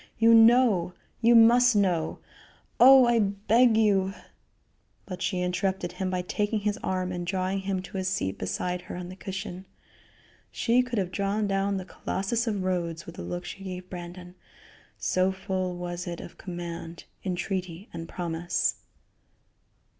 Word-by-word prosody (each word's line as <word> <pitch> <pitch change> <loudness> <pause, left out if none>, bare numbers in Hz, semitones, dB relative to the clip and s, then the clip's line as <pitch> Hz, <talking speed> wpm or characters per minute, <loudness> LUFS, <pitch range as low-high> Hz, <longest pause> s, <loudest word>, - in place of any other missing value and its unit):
You 230 +1 +6
know 225 -6 +5 0.3
you 235 +1 +5
must 240 +1 +6
know 180 -6 +1 0.6
oh! 265 +1 +9
I 240 -1 +3
beg 215 +3 +3
you 195 -3 +2 0.4
" - - -42
But 185 -2 -7
she 185 -2 -1
interrupted 180 0 -1
him 190 -1 -3
by 180 -1 -2
taking 210 +3 -1
his 210 +2 -1
arm 185 -1 -1
and 175 -1 -4
drawing 185 +2 -1
him 190 -1 -2
to 190 +1 -6
a - - -2
seat 185 - -2
beside 180 - -2
her - - -8
on 180 0 -6
the 185 - -9
cushion. 190 -1 -6 0.8
She 240 +1 +2
could 250 -2 -4
have 185 -3 -1
drawn 200 +3 -1
down 195 0 0
the 185 - -5
Colossus 220 +6 -2
of 205 -4 -1
Rhodes 170 -3 -2
with - - -9
the - - -8
look 90 +1 -5
she 195 - -8
gave 185 -1 -7
Brandon, 180 0 -8 0.6
so 185 +1 +1
full 190 -2 -3
was 175 0 -5
it 170 -1 -5
of - - -10
command, 170 -2 -7 0.2
entreaty 185 0 -3
and 165 0 -7
promise. 170 -1 -1
190 Hz, 160 wpm, -27 LUFS, 180-205 Hz, 0.8 s, oh